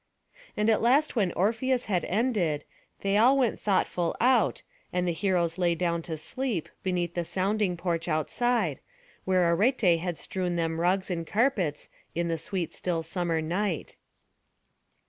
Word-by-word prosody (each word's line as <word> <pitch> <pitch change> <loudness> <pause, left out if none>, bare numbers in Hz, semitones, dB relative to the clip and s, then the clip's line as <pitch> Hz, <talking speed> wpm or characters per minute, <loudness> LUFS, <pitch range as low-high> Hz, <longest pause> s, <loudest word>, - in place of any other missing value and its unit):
And 210 +1 +1
at 220 -1 +3
last 275 +6 +3
when 195 -6 +2
Orpheus 235 +6 +1
had 185 -4 0
ended, 195 - 0 0.4
they 200 +1 +1
all 250 +6 +5
went 250 -4 +1
thoughtful 180 -4 0
out, 255 +2 +3 0.3
and 180 0 0
the - - +2
heroes 175 -1 0
lay 175 -2 +2
down 170 0 0
to 160 - -3
sleep, 230 - -3
beneath 175 -2 -1
the 175 - -1
sounding 190 +1 0
porch 170 -1 -2
outside, 175 - 0 0.5
where 185 -1 +3
Arete 195 -3 +3
had 175 -1 -3
strewn 180 -2 -3
them 165 -1 -1
rugs 185 +2 +1
and 165 -2 -3
carpets, 205 - 0 0.3
in 170 0 0
the 165 -1 -1
sweet 180 +1 -3
still 170 -3 -2
summer 170 -2 -1
night. 175 +1 -2
180 Hz, 150 wpm, -28 LUFS, 170-215 Hz, 0.5 s, all